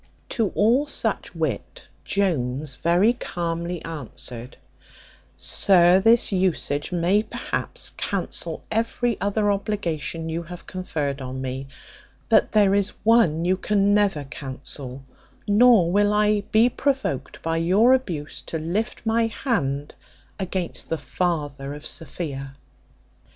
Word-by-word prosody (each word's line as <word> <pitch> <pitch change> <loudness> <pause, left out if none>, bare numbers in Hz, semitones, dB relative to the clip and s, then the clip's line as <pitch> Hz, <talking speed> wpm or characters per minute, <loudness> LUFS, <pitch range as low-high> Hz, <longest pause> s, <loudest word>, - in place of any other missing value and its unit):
To 225 -6 0
all 240 +8 +3
such - - -2
wit, - - -3 0.2
Jones 145 -7 -1
very 180 +7 +3
calmly 170 -5 -4
answered, 125 -5 -8 0.8
"Sir, 180 -1 +4
this 225 +3 +4
usage 180 -6 0
may 180 +4 +2
perhaps - - -3
cancel - - -3
every 230 +1 0
other 205 +1 +1
obligation 170 -6 -2
you 165 +1 -2
have 175 +1 -10
conferred 150 -7 -3
on 130 0 -5
me; 130 +1 -4 0.6
but - - +4
there 205 -2 +4
is 200 0 +1
one 180 -8 +4
you 185 +1 +3
can 200 0 +2
never 200 -8 +2
cancel; 135 -1 -8 0.4
nor 210 -4 +5
will 205 +2 +3
I 210 -1 +2
be 220 +2 +5
provoked 265 - -2
by 165 0 0
your 195 +10 +4
abuse 170 - -2
to 165 - -3
lift 180 +10 -3
my 225 +1 +2
hand 150 - -2 0.5
against 185 -2 -3
the 165 - 0
father 145 -6 -2
of 150 - -11
Sophia." 135 -3 -5
180 Hz, 120 wpm, -24 LUFS, 150-210 Hz, 0.8 s, nor